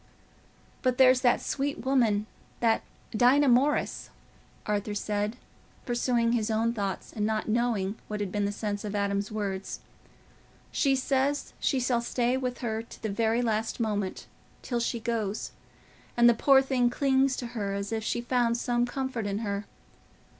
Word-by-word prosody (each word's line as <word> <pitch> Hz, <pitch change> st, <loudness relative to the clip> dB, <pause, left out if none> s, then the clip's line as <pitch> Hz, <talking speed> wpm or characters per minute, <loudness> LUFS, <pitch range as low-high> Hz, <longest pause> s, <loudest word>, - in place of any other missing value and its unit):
"But 255 Hz, -1 st, +1 dB
there's 255 Hz, -1 st, +6 dB
that 245 Hz, -2 st, +3 dB
sweet 280 Hz, -1 st, -2 dB
woman—that 225 Hz, -2 st, +1 dB, 0.3 s
Dinah 260 Hz, +6 st, +5 dB
Morris," 270 Hz, +5 st, +2 dB, 0.6 s
Arthur 210 Hz, 0 st, -1 dB
said, 210 Hz, +2 st, -2 dB, 0.5 s
pursuing 240 Hz, -1 st, +1 dB
his 230 Hz, -2 st, 0 dB
own 225 Hz, +1 st, +1 dB
thoughts 200 Hz, -4 st, -4 dB
and 210 Hz, -, -2 dB
not 215 Hz, 0 st, 0 dB
knowing 220 Hz, -3 st, 0 dB
what 210 Hz, 0 st, -4 dB
had 200 Hz, -3 st, -3 dB
been 205 Hz, 0 st, 0 dB
the 200 Hz, -, 0 dB
sense 205 Hz, 0 st, -3 dB
of 210 Hz, -1 st, -4 dB
Adam's 200 Hz, +1 st, -1 dB
words, 200 Hz, -3 st, -4 dB, 0.9 s
"she 275 Hz, -2 st, +2 dB
says 270 Hz, +2 st, 0 dB
she 270 Hz, -, +1 dB
shall 245 Hz, -1 st, +1 dB
stay 240 Hz, +1 st, 0 dB
with 255 Hz, -1 st, -3 dB
her 220 Hz, -2 st, -2 dB
to 230 Hz, -, -13 dB
the 220 Hz, -, -1 dB
very 225 Hz, +3 st, +1 dB
last 225 Hz, 0 st, -1 dB
moment—till 215 Hz, +3 st, -4 dB
she 235 Hz, 0 st, -1 dB
goes; 220 Hz, -3 st, -2 dB, 0.7 s
and 240 Hz, 0 st, +7 dB
the 240 Hz, -, +7 dB
poor 270 Hz, +3 st, +5 dB
thing 255 Hz, -2 st, +2 dB
clings 265 Hz, +1 st, +2 dB
to 245 Hz, -, -5 dB
her 200 Hz, -4 st, -2 dB
as 200 Hz, +1 st, -4 dB
if 220 Hz, -1 st, -2 dB
she 235 Hz, -, -1 dB
found 240 Hz, -1 st, +1 dB
some 240 Hz, 0 st, 0 dB
comfort 255 Hz, -4 st, -3 dB
in 200 Hz, 0 st, -1 dB
her. 200 Hz, 0 st, -2 dB
230 Hz, 155 wpm, -28 LUFS, 210-250 Hz, 0.9 s, and